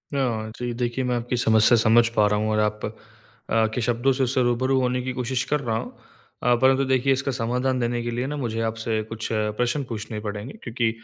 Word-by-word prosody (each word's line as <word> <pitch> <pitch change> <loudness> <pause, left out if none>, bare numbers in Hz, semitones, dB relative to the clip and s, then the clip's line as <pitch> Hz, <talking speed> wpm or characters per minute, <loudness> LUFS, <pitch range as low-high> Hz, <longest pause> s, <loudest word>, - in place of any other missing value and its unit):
हाँ, 115 -5 -1
जी 120 -1 -3
देखिए 120 +2 -2
मैं 125 -1 0
आपकी 120 +1 -2
समस्या 110 0 +5
समझ 115 +1 +5
पा 105 - +4
रहा 105 0 +1
हूँ। 110 0 0
और 110 - +1
आप 105 0 0
अ, 110 - -4 0.8
के 125 - -1
शब्दों 120 +3 +1
से 130 0 0
उससे 130 +1 +1
रूबरू 130 +2 +1
होने 125 0 0
की 130 +1 -3
कोशिश 125 +1 -1
कर 150 - +3
रहा 115 -4 -2
हूँ। - - -5 0.5
अ, 125 - +4
परंतु 135 +1 +4
देखिए 130 +1 +2
इसका 135 +1 -1
समाधान 125 +1 -1
देने 120 0 -1
के 120 - -3
लिए 125 +3 -2
ना 150 - -3
मुझे 115 -4 -3
आपसे 110 0 -2
कुछ 110 0 -4
प्रश्न 110 +6 0
पूछने 110 -1 -5
पड़ेंगे 105 +3 -5
क्योंकि 120 -1 0
120 Hz, 215 wpm, -24 LUFS, 110-130 Hz, 0.8 s, समस्या